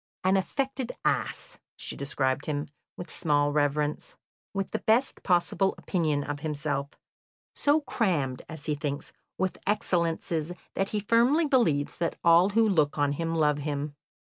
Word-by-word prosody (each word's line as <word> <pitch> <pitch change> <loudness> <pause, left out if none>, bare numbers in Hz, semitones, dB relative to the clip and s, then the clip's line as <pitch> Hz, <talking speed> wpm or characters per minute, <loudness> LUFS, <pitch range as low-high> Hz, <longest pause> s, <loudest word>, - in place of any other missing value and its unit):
"An 190 +1 +4
affected 260 +6 -1
ass," - - -1 0.2
she - - -6
described 135 -1 -1
him, 145 -1 -1 0.3
with 175 - -7
small 145 -2 +2
reverence, 150 0 0 0.4
"with 195 -1 -3
the - - -1
best 235 +5 +2
possible 185 +1 +2
opinion 155 -6 0
of 145 0 -4
himself; 145 -2 -2 0.6
so 295 +2 +3
crammed, 170 - 0
as 155 -1 -7
he 150 - 0
thinks, 145 -1 -4 0.2
with 190 0 -1
excellences 170 -4 0 0.2
that 195 - -1
he 210 - -1
firmly 240 +10 +4
believes 170 - +2
that 170 - 0
all 170 +3 +6
who 225 +2 +3
look 155 -8 +2
on 145 -1 +2
him 165 +3 -2
love 150 -2 +2
him." 145 0 -3
165 Hz, 150 wpm, -28 LUFS, 145-195 Hz, 0.6 s, all